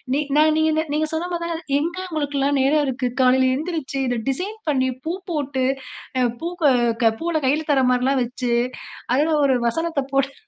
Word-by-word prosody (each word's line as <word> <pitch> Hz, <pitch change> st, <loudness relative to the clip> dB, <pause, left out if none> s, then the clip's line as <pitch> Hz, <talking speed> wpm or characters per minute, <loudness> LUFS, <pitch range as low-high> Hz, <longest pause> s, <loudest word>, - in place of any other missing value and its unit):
நீங் 290 Hz, -1 st, -2 dB
நான் 310 Hz, 0 st, +5 dB
நீங்க 315 Hz, 0 st, +2 dB
நீங்க 310 Hz, +1 st, +1 dB
சொன்ன 335 Hz, +3 st, -2 dB
மாதிரி 340 Hz, 0 st, -3 dB
தான் 325 Hz, 0 st, -8 dB
எங்க 335 Hz, +4 st, -3 dB
நமக்கெல்லாம் 285 Hz, -4 st, 0 dB
நேரம் 295 Hz, +3 st, +3 dB
இருக்கு. 255 Hz, -1 st, -1 dB
காலையில 260 Hz, 0 st, +4 dB
எழுந்திருச்சு 305 Hz, -1 st, -3 dB
இதை 245 Hz, -1 st, -1 dB
டிசைன் 375 Hz, +11 st, -3 dB
பண்ணி 260 Hz, -3 st, +2 dB, 0.2 s
பூ 330 Hz, -, -1 dB, 0.2 s
போட்டு, 280 Hz, -4 st, -1 dB, 0.5 s
அ -, -, +3 dB, 0.2 s
பூவ 335 Hz, -4 st, +2 dB, 0.5 s
பூவ்ல 335 Hz, -1 st, 0 dB
கையில 300 Hz, +4 st, +1 dB
தர்ற 270 Hz, -2 st, +3 dB
மாதிரில்லாம் 255 Hz, +2 st, +2 dB
வச்சு 245 Hz, 0 st, -3 dB, 0.6 s
அதில 310 Hz, +3 st, +2 dB
ஒரு 265 Hz, -2 st, +3 dB
வசனத்தை 320 Hz, +3 st, -1 dB
போட்டு. 275 Hz, 0 st, +1 dB
290 Hz, 165 wpm, -22 LUFS, 265-320 Hz, 0.6 s, நான்